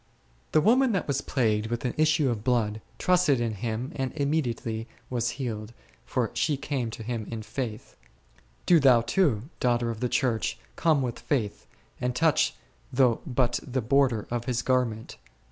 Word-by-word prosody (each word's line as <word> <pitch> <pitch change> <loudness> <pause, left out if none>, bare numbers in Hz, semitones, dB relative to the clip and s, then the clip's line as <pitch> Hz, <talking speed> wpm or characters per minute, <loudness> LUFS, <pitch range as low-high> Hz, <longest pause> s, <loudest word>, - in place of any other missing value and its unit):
The 155 - +4
woman 245 - +4
that 190 - -1
was 140 -1 0
plagued 110 -5 0
with 120 +2 -3
an 125 - 0
issue 155 -3 +3
of 110 -3 -4
blood 110 -4 +1 0.2
trusted 180 -8 +3
in 115 -2 -1
Him 115 +5 -3
and 130 -2 -2
immediately 125 -7 -1 0.2
was 120 -1 0
healed, 115 -4 -4 0.3
for - - -1
she 150 -3 +1
came 135 -4 -2
to 110 0 -7
Him 115 -2 -4
in 115 -2 -5
faith. 110 -2 -5 0.7
Do 175 -2 +6
thou, 130 -4 +6
too, 120 - +1 0.2
daughter 120 -1 +1
of 110 - -7
the 125 0 -1
Church, 120 -5 0 0.2
come 155 -4 +2
with 120 -2 -3
faith, 115 -8 -2 0.3
and 125 0 -1
touch 160 0 +3 0.4
though 125 -3 +3
but 125 -2 +1
the 130 0 -3
border 125 -2 +2
of 120 -1 -2
His 125 -1 -1
garment. 125 -4 0
125 Hz, 165 wpm, -27 LUFS, 115-140 Hz, 0.7 s, Do